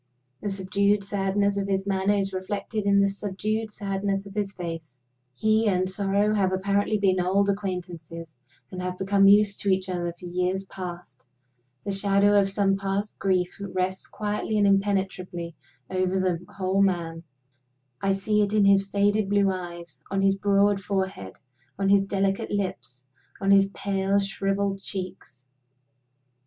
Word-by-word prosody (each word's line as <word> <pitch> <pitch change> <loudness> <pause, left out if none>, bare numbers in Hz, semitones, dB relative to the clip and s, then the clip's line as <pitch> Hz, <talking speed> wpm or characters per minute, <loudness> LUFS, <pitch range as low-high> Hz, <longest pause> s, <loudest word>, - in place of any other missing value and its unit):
The 205 - -2
subdued 200 +1 +1
sadness 200 0 0
of 200 0 -1
his 195 -1 0
manner 195 +1 +1
is 195 -1 -1
reflected 200 +3 -3
in 200 0 +5
the 200 - +4
subdued 210 +2 -3
sadness 195 -1 -2
of 200 - -10
his 200 -1 -2
face. 165 -8 -7 0.4
He 215 - +2
and 185 -2 +2
sorrow 200 +2 +1
have 195 -3 +2
apparently 200 +3 +1
been 190 -2 +2
old 195 +3 +2
acquaintances, 175 -5 -5 0.4
and 185 - -5
have 180 0 -4
become 195 +1 +3
used 205 0 +5
to 200 - 0
each 190 0 +1
other 175 -1 -2
for - - -10
years 180 +2 -1
past. 175 -8 -8 0.6
The 200 - -3
shadow 200 +1 +3
of 195 - +1
some 195 0 +2
past 195 +1 -3
grief 185 -2 0
rests 185 -1 -2
quietly 210 +1 -2
and 205 - +4
impenetrably 190 -4 0 0.4
over 185 0 0
the 180 -2 0
whole 190 0 0
man; 170 -4 0 0.8
I 195 0 +2
see 210 +2 +1
it 205 0 0
in 210 -2 +4
his 195 0 +4
faded 205 +1 +1
blue 200 -1 +3
eyes, 175 -2 -7
on 195 0 0
his 195 0 +3
broad 200 0 +2
forehead, 190 - -3 0.4
on 195 0 +1
his 195 0 +4
delicate 195 -1 0
lips, 185 -10 -4 0.3
on 195 0 +1
his 195 0 +5
pale 195 0 0
shriveled 195 0 -1
cheeks. 180 -10 -7
195 Hz, 155 wpm, -26 LUFS, 185-200 Hz, 0.8 s, in